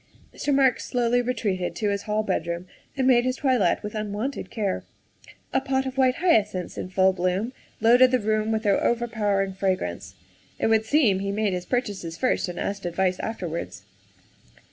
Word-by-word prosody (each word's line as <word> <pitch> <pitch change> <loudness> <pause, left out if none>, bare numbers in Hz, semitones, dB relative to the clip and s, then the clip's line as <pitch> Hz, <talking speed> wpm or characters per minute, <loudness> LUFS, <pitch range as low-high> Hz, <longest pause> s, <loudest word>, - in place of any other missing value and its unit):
' - - -27
' - - -33
Mr. 290 - -1
Marks 270 -2 +3
slowly 245 0 +1
retreated 215 -7 -2
to 210 -2 -1
his 200 0 -1
hall 215 +1 +1
bedroom 170 -3 -2 0.3
and 265 - +1
made 245 -2 +5
his 255 0 0
toilet 250 -12 +1
with 210 - -5
unwonted 215 +5 -3
care. 205 -4 -2 0.7
A - - +2
pot 265 0 0
of 260 0 -4
white 260 -1 +3
hyacinths 215 - +1
in - - -5
full 190 +1 +3
bloom 185 +6 -1 0.3
loaded 245 +3 +6
the 255 - +3
room 215 -1 0
with 220 0 -1
their 200 -2 +2
over 240 0 +1
powering 200 -4 0
fragrance. 185 - -2 0.4
It - - -1
would 220 -1 +3
seem 230 -6 +3
that - - -4
he 200 - -1
made 205 -1 0
his 180 0 -3
purchases 205 -10 -2
first 255 -4 +1
and 175 -1 -6
asked 200 -2 -3
advice 185 +1 0
afterwards. 165 - -5
215 Hz, 190 wpm, -25 LUFS, 190-245 Hz, 0.7 s, loaded